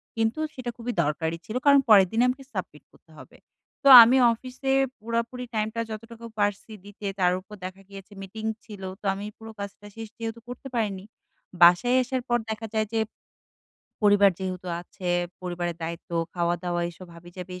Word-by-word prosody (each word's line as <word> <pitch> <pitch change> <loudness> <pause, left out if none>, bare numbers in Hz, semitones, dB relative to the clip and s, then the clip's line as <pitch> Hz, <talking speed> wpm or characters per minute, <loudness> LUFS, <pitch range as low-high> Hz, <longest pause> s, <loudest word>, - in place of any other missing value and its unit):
কিন্তু 225 +5 0
সেটা 250 -2 -5
খুবই 240 +1 -4
দরকারি 160 +3 -2
ছিল। 225 +1 -7
কারণ, 280 -1 +7
পরের 195 -3 +8
দিনে 230 +2 +2
আমাকে 270 +2 -4
সাবমিট 180 -7 -6
করতে 160 - -24
হবে। 130 - -14 0.5
তো - - +3 0.2
আমি 250 +3 +4 0.2
অফিসে 255 +3 -5 0.3
পুরাপুরি 235 +3 -3
টাইমটা 220 +2 -1
যতটুকু 230 +2 -9
পারছি 205 +2 -1
দিতে। 205 0 -11
তার 180 -1 +4
উপর 210 +3 -13
দেখা 185 +1 -8
গিয়েছে 195 +1 -12
মিটিং 215 +3 -8 0.2
ছিল। 205 -3 -10 0.2
তো - - -13
আমি 200 +1 -6
পুরো 225 0 -10
কাজটা 200 +1 -8
শেষ 225 -1 -7
যেহেতু 225 0 -5
করতে 245 +2 -8
পারিনি। 200 -4 -1 0.6
বাসায় 245 +9 +6
আসার 255 0 -2
পর 240 - +3
দেখা 220 +1 -4
যায় 215 -1 0
যে 225 - +1 1.0
পরিবার 205 -1 +6
যেহেতু 185 -1 -5
আছে। 180 +1 -8 0.3
পরিবারের 175 -1 -3
দায়িত্ব, 165 +1 -6 0.2
খাওয়াদাওয়া, 175 0 -1
এসব 180 +2 -13
হাবিজাবি, 175 +2 -10
210 Hz, 165 wpm, -26 LUFS, 180-230 Hz, 1.0 s, পরের